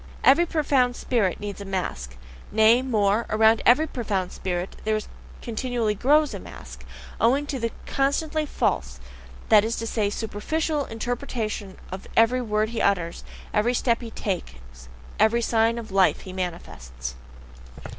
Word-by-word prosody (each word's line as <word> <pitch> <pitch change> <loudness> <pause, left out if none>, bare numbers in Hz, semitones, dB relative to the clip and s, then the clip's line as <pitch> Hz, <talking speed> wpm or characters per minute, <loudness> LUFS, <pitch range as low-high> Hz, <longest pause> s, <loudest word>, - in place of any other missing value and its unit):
Every 335 +6 +6
profound 275 -6 +2
spirit 215 -10 0
needs 205 -1 -6
a - - -6
mask; 65 - -4 0.3
nay, 220 +3 +5
more, 215 -3 +1
around 220 +1 +4
every 275 +6 +6
profound 205 - -2
spirit 180 0 -4
there 215 0 +1 0.4
continually 235 -2 -1
grows 290 +6 +3
a 200 - -5
mask, 65 - -11 0.4
owing 265 +6 +3
to 280 -3 -4
the 230 0 -1 0.2
constantly 300 +3 0
false, 65 - -1 0.5
that 210 -2 +7
is 225 +2 -1
to 230 - -4
say, 215 -2 0
SUPERFICIAL 285 +9 -2
interpretation 225 -4 -4
of 190 +1 -7
every 235 +3 +4
word 215 -2 0
he 230 -1 -3
utters, 175 -4 0 0.3
every 230 +3 +2
step 235 -1 +1
he 235 - -7
takes, 65 - -6 0.3
every 225 +3 +3
sign 230 0 +2
of 225 -3 -7
life 190 -1 +3
he 185 - -9
manifests. 65 - -6
220 Hz, 145 wpm, -25 LUFS, 190-245 Hz, 0.5 s, that